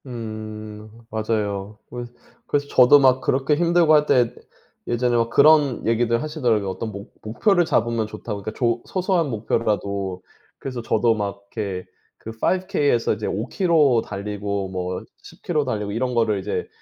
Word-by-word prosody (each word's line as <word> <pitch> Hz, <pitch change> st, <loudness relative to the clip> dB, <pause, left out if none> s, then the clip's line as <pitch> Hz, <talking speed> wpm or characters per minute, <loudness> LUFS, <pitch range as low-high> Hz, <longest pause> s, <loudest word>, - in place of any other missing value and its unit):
음 110 Hz, -2 st, -7 dB, 0.2 s
맞아요. 105 Hz, -2 st, -2 dB
그 120 Hz, 0 st, -6 dB, 0.4 s
그래서 145 Hz, 0 st, 0 dB
저도 130 Hz, +2 st, +6 dB
막 130 Hz, -1 st, +4 dB
그렇게 135 Hz, +3 st, +1 dB
힘들고 170 Hz, 0 st, +3 dB
할 150 Hz, -1 st, +5 dB
때 120 Hz, -2 st, +3 dB, 0.5 s
예전에 120 Hz, 0 st, +1 dB
막 115 Hz, -1 st, +2 dB
그런 145 Hz, -2 st, +4 dB
얘기들 115 Hz, +1 st, +1 dB
하시더라고요, 120 Hz, -10 st, 0 dB
어떤 110 Hz, +4 st, -4 dB
목 100 Hz, 0 st, -10 dB
목표를 175 Hz, -, +2 dB
잡으면 115 Hz, -6 st, 0 dB
좋다고 105 Hz, -1 st, -6 dB
그 110 Hz, -, -5 dB
조 115 Hz, -1 st, 0 dB
소소한 180 Hz, -4 st, 0 dB
목표라도. 100 Hz, -4 st, -2 dB, 0.3 s
그래서 130 Hz, -3 st, -5 dB
저도 115 Hz, +1 st, +2 dB
막 100 Hz, -1 st, -4 dB
이렇게 100 Hz, -5 st, -3 dB, 0.3 s
그 -, -, -10 dB
5 185 Hz, +11 st, 0 dB
K에서 145 Hz, -, +1 dB
이제 105 Hz, 0 st, -5 dB
5 110 Hz, +6 st, -2 dB
킬로 155 Hz, -, +3 dB
달리고 100 Hz, -1 st, -4 dB
뭐 90 Hz, -1 st, -4 dB, 0.2 s
10 -, -, -15 dB
킬로 155 Hz, -4 st, 0 dB
달리고 105 Hz, -1 st, -3 dB
이런 125 Hz, +3 st, -2 dB
거를 110 Hz, -3 st, +2 dB
이제 95 Hz, -, -3 dB
115 Hz, 310 characters per minute, -22 LUFS, 105-135 Hz, 0.5 s, 저도